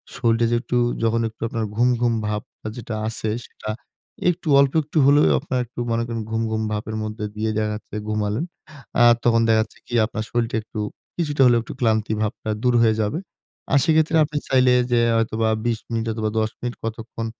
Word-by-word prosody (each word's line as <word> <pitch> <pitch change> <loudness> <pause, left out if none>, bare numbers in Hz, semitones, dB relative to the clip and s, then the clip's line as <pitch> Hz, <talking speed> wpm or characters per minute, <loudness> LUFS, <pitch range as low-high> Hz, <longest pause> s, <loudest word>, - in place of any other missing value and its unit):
শরীর 115 0 +1
যে - - +3
একটু, 125 - -1 0.3
যখন 115 0 +2
একটু 110 - -24
আপনার 115 -1 -2
ঘুম, 120 +3 +3
ঘুম 120 -1 +3
ভাবটা 105 +1 -5
যেটা 115 -2 -5
আছে 110 0 -3 0.2
সেটা 110 - -9 0.6
একটু, 175 -1 -3
অল্প 140 -1 +4
একটু 150 +2 -5
হলেও 145 +2 +6
আপনার 135 -3 -2
একটু 120 +1 -11
মনে 115 0 +1
করেন 115 -1 -3
ঘুম, 110 0 -1
ঘুম 110 0 -1
ভাবের 110 +1 -3
মধ্যে 110 0 -4
দিয়ে 110 +1 -1
দেখা 110 0 0
যাচ্ছে 105 0 -8
ঘুমালেন। 105 +6 -1 0.6
আর 120 0 +8
তখন 115 -1 +4
দেখা 110 -1 +4
যাচ্ছে 110 - -17
কি - - -9
আপনার 110 0 -4
শরীরটা 120 -1 -1
একটু, 110 - -7 0.4
কিছুটা 150 -5 0
হলেও 120 -1 +5
একটু - - -8
ক্লান্তি 110 -2 +1
ভাবটা 110 0 -3
দূর 125 -1 +3
হয়ে 110 -1 +4
যাবে। 105 +9 -1 0.5
আর 135 - +5
সেক্ষেত্রে 160 +1 +3
আপনি 150 0 -5
চাইলে 130 -1 +4 0.2
যে 120 - +4 0.2
হয়তোবা 115 0 +1 0.2
২০ 115 -2 0
মিনিট 115 -1 -1
অথবা 110 -1 -1
১০ 110 0 +1
মিনিট 120 0 -4
কতক্ষণ 115 0 -5
115 Hz, 195 wpm, -22 LUFS, 110-125 Hz, 0.6 s, আর